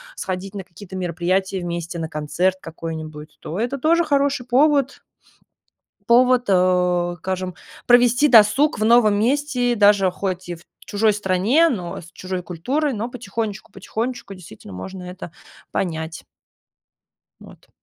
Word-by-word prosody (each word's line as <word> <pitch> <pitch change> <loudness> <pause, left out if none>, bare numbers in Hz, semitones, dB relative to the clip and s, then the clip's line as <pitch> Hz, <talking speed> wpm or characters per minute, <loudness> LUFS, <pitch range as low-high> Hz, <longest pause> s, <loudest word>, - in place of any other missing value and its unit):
сходить 190 +1 -5
на 195 - -5
какие-то 190 +1 -12
мероприятия 185 +2 -1
вместе, 170 0 -4
на 160 -1 -4
концерт 155 +5 -1
какой-нибудь, 155 -2 -8
то 165 - -6
это 245 +5 -1
тоже 330 +5 +3
хороший 280 -4 0
повод. 275 +2 +2 1.1
Повод, 250 +1 +5
э, 180 -2 +2
скажем, 185 0 -3 0.3
провести 245 +3 +5
досуг 235 +7 +5
в 215 - +1
новом 220 -3 +5
месте, 250 0 +1
даже 205 -3 +4
хоть 185 0 -4
и 175 - -3
в 165 - -17 0.2
чужой 215 +1 +2
стране, 205 - +2
но 185 - -3
с 170 - -13
чужой 185 0 -5
культурой, 260 - -2
но 225 +2 -3
потихонечку, 220 -4 -5
потихонечку 220 +2 -5
действительно 160 - -13
можно 180 - -8
это 180 -2 -9 0.4
понять. 160 -3 -3 1.2
Вот. - - -16
195 Hz, 130 wpm, -21 LUFS, 180-245 Hz, 1.2 s, Повод